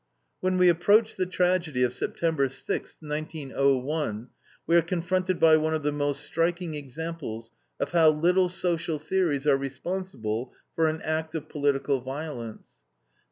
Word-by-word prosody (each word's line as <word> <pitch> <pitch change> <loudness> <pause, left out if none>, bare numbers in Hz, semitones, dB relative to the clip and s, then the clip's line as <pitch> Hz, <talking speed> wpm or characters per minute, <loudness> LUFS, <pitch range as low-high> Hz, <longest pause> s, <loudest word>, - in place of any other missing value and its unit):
When 185 0 0
we 180 0 +5
approach 205 +6 +4
the 185 -1 -1
tragedy 180 -7 +1
of 125 0 +1
September 145 +1 0
sixth, 135 - -5
1901, 140 -5 -1 0.4
we 165 - +3
are 170 - +7
confronted 180 +1 -1
by 160 -1 +7
one 155 0 0
of 155 - -3
the 150 - +1
most 145 -1 -1
striking 170 0 -1
examples 145 -5 -6 0.3
of - - -2
how 165 -2 +6
little 180 +4 +3
social 170 -3 -1
theories 155 -3 0
are 140 -2 +5
responsible 135 - -4 0.2
for 165 -1 +3
an 155 0 -2
act 160 0 -2
of 155 -1 -5
political 140 -1 +1
violence. 130 -4 -7
155 Hz, 145 wpm, -27 LUFS, 140-175 Hz, 0.4 s, are